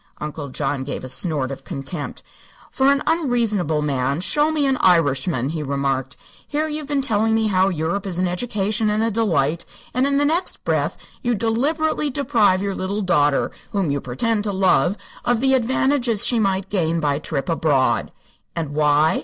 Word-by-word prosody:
Uncle 150 -1 -6
John 130 +1 -2
gave 140 - -5
a - - -5
snort 145 -3 -1
of 135 - -7
contempt. 145 -1 -6 0.5
"For 270 0 +3
an 280 +1 +1
unreasonable 230 - +1
man, 140 0 0
show 295 +10 +2
me 300 -2 +1
an 270 -1 +2
Irishman," 145 - +2
he 160 0 -3
remarked. 140 -2 -2 0.3
"Here 305 +2 -1
you've 300 -1 -4
been 285 -2 0
telling 220 -2 +1
me 225 0 +1
how 190 0 +3
Europe 180 +4 -2
is 180 -3 -3
an 185 0 +1
education 210 +2 -1
and 210 +1 +1
a 230 - +1
delight, 170 -8 +1 0.3
and 255 +2 +2
in 280 0 +1
the 290 - +2
next 330 +5 -1
breath - - 0 0.2
you 240 -1 0
deliberately 290 +8 0
deprive 225 -9 +2
your 200 -1 -1
little 200 +3 -3
daughter, 145 -6 +2 0.2
whom 195 -7 0
you 140 -1 -1
pretend 205 - -1
to 205 - 0
love, 190 0 +2 0.3
of 240 -1 +1
the 265 +2 +3
advantages 255 -2 +2
she 240 - +2
might 195 -2 0
gain 170 -4 +1
by 145 -3 +1
a 140 - -2
trip 145 -3 -3
abroad! 155 -5 +1 0.4
And 165 -3 -3
why? 150 +1 +3
190 Hz, 180 wpm, -21 LUFS, 150-240 Hz, 0.5 s, For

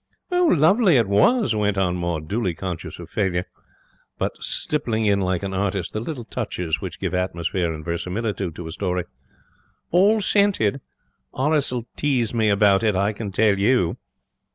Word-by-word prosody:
'Lovely 200 - +4
it 115 -4 +2
was,' 115 - +3
went 105 -1 0
on 90 -2 +1
Maud, 85 -3 -3
dully 100 -3 -1
conscious 90 -1 -5
of - - -9
failure, 95 -3 -1 0.7
but - - -1
stippling 115 -7 -1
in 100 -1 +3
like 95 0 -1
an 95 -1 -3
artist 95 -2 -2
the 110 - -2
little 125 +2 -5
touches 90 -9 -3
which - - -6
give - - -3
atmosphere 90 -1 -1
and 80 -1 -7
verisimilitude 90 +1 -3
to 90 - -7
a 80 - -6
story. 90 0 -2 0.9
'All 200 +5 +4
scented. 195 - +2 0.5
Horace 145 +1 +1
will 120 -2 -3
tease 125 -6 0
me 110 -2 +2
about 100 -1 +4
it, 110 -3 +1
I 100 +3 +1
can 105 -1 -5
tell 105 0 +2
you.' 100 -5 +2
100 Hz, 160 wpm, -23 LUFS, 90-125 Hz, 0.9 s, Lovely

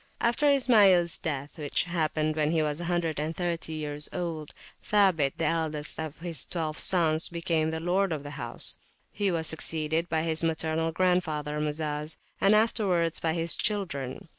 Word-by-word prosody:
After 240 +5 +2
Ismails 205 - +4
death, 145 0 -4
which 145 -2 +1
happened 155 -3 -1
when 155 -1 +1
he 160 -1 +1
was 150 0 -2
130 165 0 -2
years 150 -1 -4
old, 165 -4 -4 0.3
Sabit, 185 -9 +2
the - - -1
eldest 155 -2 -1
of 160 -1 -5
his 170 -4 -3
twelve 160 -3 -4
sons, 165 -3 +2
became 165 -2 -1
lord 175 +4 0
of 150 -3 -3
the 145 - -7
house. 120 -5 +2 0.3
He 200 -1 -1
was 165 -3 -1
succeeded 160 +1 0
by 160 -1 0
his 160 0 0
maternal 160 0 0
grandfather 160 -4 0
Muzaz, 150 0 -3 0.2
and 200 +2 +5
afterwards 195 -7 +1
by 160 -1 0
his 165 0 +1
children. 165 -10 -3
160 Hz, 150 wpm, -28 LUFS, 155-175 Hz, 0.3 s, and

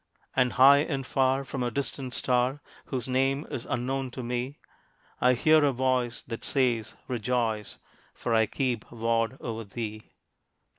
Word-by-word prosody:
And 125 -2 +3
high 140 +2 +8
and 140 -3 -1
far, 135 +1 +1
from 135 0 -4
a 120 - +1
distant 130 0 -3
star, 125 +2 +1 0.3
Whose 130 -2 -3
name 135 +3 +1
is 120 - -5
unknown 130 +2 -2
to 130 - -3
me, 125 +3 -3 0.6
I 125 0 +4
hear 155 +4 +5
a 145 - +4
voice 125 -2 0
that 115 -1 -7
says, 120 -5 0
"Rejoice, 115 -3 -1 0.4
For 115 - -2
I 110 -1 +4
keep 125 -3 -2
ward 115 +1 0
o'er 115 -1 -4
thee!" 110 0 -6
125 Hz, 150 wpm, -28 LUFS, 115-135 Hz, 0.6 s, high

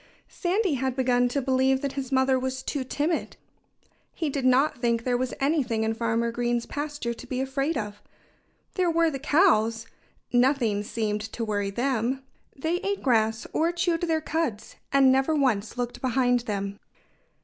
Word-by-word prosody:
Sandy 375 0 0
had 260 -1 -1
begun 250 -1 +2
to 270 +2 -1
believe 265 0 +2
that 280 - -2
his 270 -1 -5
mother 265 0 +3
was 260 0 -3
too 285 -3 -2
timid. 295 +6 -2 0.8
He 315 -4 -2
did 270 -2 -2
not 255 +1 +3
think 235 -1 +1
there 250 0 +1
was 255 +1 -2
anything 270 -6 +1
in 220 0 0
Farmer 230 +1 0
Green's 240 0 -1
pasture 290 -5 -4
to - - -11
be 255 - -3
afraid 275 +3 -1
of. 205 -2 -5 0.7
There 365 -2 +1
were 330 -1 +3
the 275 - -4
cows 230 - +3 0.5
nothing 245 -4 +3
seemed 210 0 -2
to 220 +1 -4
worry 205 -2 -1
them. 250 +3 -1 0.3
They 320 +5 -1
ate 400 +2 -3
grass, 225 -3 +2
or 330 +2 +2
chewed 345 -1 0
their 325 -2 +1
cuds, 305 -9 -3 0.2
and 275 -1 +5
never 270 +4 +2
once 245 -7 0
looked 245 -1 -3
behind 250 -1 +2
them. 200 0 -3
260 Hz, 165 wpm, -26 LUFS, 230-290 Hz, 0.8 s, and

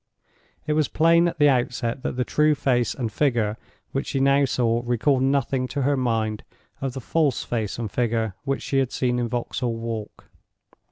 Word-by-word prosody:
It 150 - 0
was 155 -2 +2
plain 170 +2 +4
at 170 - -3
the 145 0 +5
outset 125 -2 0
that - - -3
the 125 - +2
true 150 0 +3
face 125 -4 +1
and 120 -5 -3
figure 115 -5 +1 0.4
which 135 - -2
she 135 - -1
now 140 +1 +4
saw 120 -3 +1
recalled 125 +3 +1
nothing 135 -1 +1
to 140 +1 -2
her 140 +2 +2
mind 115 -4 -1 0.4
of 135 -2 -2
the 135 - -5
false 150 +1 +1
face 110 -4 -3
and 115 -4 -4
figure 115 -3 0
which 135 0 -2
she 135 - 0
had 130 -2 0
seen 125 -1 0
in 120 -1 -1
Vauxhall 120 0 -2
Walk. 115 -2 -6
125 Hz, 185 wpm, -24 LUFS, 115-140 Hz, 0.4 s, the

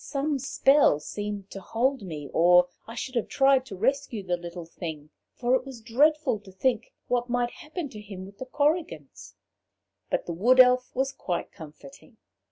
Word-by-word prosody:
Some 285 0 -1
spell 275 - +4
seemed 205 +4 -6
to 195 - -7
hold 250 +7 0
me, 155 -7 -7
or 175 +1 +6 0.2
I 230 - -8
should 255 - -5
have 235 -3 -1
tried 270 -1 +3
to 200 - -7
rescue 245 0 -1
the 180 -1 0
little 175 0 -8
thing; 160 -3 -8 0.2
for 245 +1 0
it 260 - +3
was 265 -3 -9
dreadful 270 +2 +2
to 200 -2 -15
think 230 +4 -1 0.2
what 245 0 0
might 240 0 0
happen 310 +1 -6
to 210 -4 -10
him 195 -3 -9
with 200 +1 -15
the 260 - -6
Korrigans. 290 - -2 0.7
But - - -1
the 170 - -4
Wood 240 +10 +3
Elf 250 0 +6
was 265 +1 0
quite 175 -9 -4
comforting. 150 -5 -13
230 Hz, 175 wpm, -27 LUFS, 180-265 Hz, 0.7 s, or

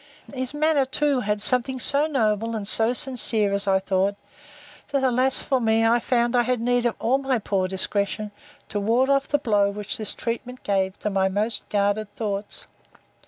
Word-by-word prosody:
His 260 -2 -3
manner 305 -1 +2
too 280 +1 0
had 210 -2 -1
something 255 +3 0
so 285 +5 +3
noble, 225 -5 0
and 205 -2 -4
so 225 +2 +3
sincere, 235 -5 0
as 200 0 -2
I 190 0 +4
thought, 190 +1 0 0.7
that, 280 -2 0
alas 255 +1 +2
for 265 -2 0
me! 225 0 +2
I 235 +1 +4
found 240 0 0
I 245 - +5
had 245 0 0
need 245 +1 +1
of 235 - -2
all 260 +4 +1
my 270 -2 0
poor 195 -3 -1
discretion, 200 +2 -2 0.4
to 205 - -2
ward 235 +6 +2
off 275 0 +2
the 290 - +2
blow 210 -7 +2
which 210 +4 -5
this 215 -2 -4
treatment 245 +2 -5
gave 190 -1 0
to 210 - -2
my 190 -1 +1
most 210 +4 -2
guarded 205 +1 0
thoughts. 205 -2 -4
225 Hz, 185 wpm, -24 LUFS, 205-255 Hz, 0.7 s, I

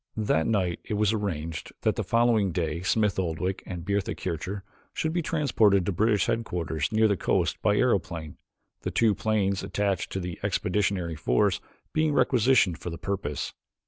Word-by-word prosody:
That 90 -7 +1
night 95 -6 0
it 105 - -3
was 105 +1 +2
arranged 85 -7 -3
that - - +1
the - - -1
following 115 -4 +2
day 85 -1 -2
Smith 105 +1 +1
Oldwick 90 +2 -2
and 90 -2 -6
Bertha 100 -1 -1
Kircher 95 +3 -4 0.3
should 160 0 -1
be 175 - +1
transported 115 - +2
to 100 - 0
British 105 +2 +2
headquarters 85 -9 -1
near 110 0 +4
the 100 - +2
coast - - 0
by 105 - +3
aeroplane, 90 - 0 0.4
the - - -2
two 115 -2 +3
planes 100 -2 0
attached 100 -2 -1
to 95 - -1
the 90 -2 -5
expeditionary 95 -3 0
force 65 -4 +1 0.3
being 155 -1 +2
requisitioned 120 - +3
for - - -5
the 85 - -6
purpose. 75 -8 -3
100 Hz, 165 wpm, -27 LUFS, 85-110 Hz, 0.4 s, near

